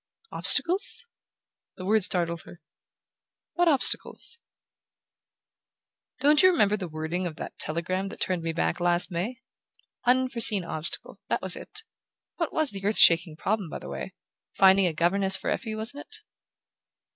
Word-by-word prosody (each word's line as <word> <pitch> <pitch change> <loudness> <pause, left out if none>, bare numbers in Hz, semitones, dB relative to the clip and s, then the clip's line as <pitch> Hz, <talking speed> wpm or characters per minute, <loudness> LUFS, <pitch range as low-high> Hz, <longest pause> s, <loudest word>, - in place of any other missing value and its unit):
"Obstacles?" 365 +7 +2 0.7
The 185 - -8
word 215 +1 +2
startled 170 -2 0
her. 175 - -14 0.9
"What 350 0 +1
obstacles?" 325 - 0 1.8
"Don't 295 +1 +5
you 370 - +7
remember 210 - +2
the 190 -4 -6
wording 160 +3 -4
of 160 - -8
the - - -7
telegram 185 +5 -2
that - - -11
turned 185 -2 -2
me 165 0 -3
back 80 - -2
last 175 +1 0
May? 180 +9 -3 0.7
'Unforeseen 245 -5 +2
obstacle': 165 +4 -4
that - - -1
was 190 -1 +3
it. 430 +2 -11 0.5
What 335 -3 -2
was 315 -3 0
the 195 -1 -8
earth 210 +2 +1
shaking 165 -1 +6
problem, 195 +1 -2
by - - -6
the - - -10
way? 65 -1 -7 0.4
Finding 190 0 +5
a 170 - -2
governess 190 +4 +3
for - - -3
Effie, 220 -3 -4
wasn't 230 +7 -6
it?" - - -8
195 Hz, 145 wpm, -26 LUFS, 170-245 Hz, 1.8 s, you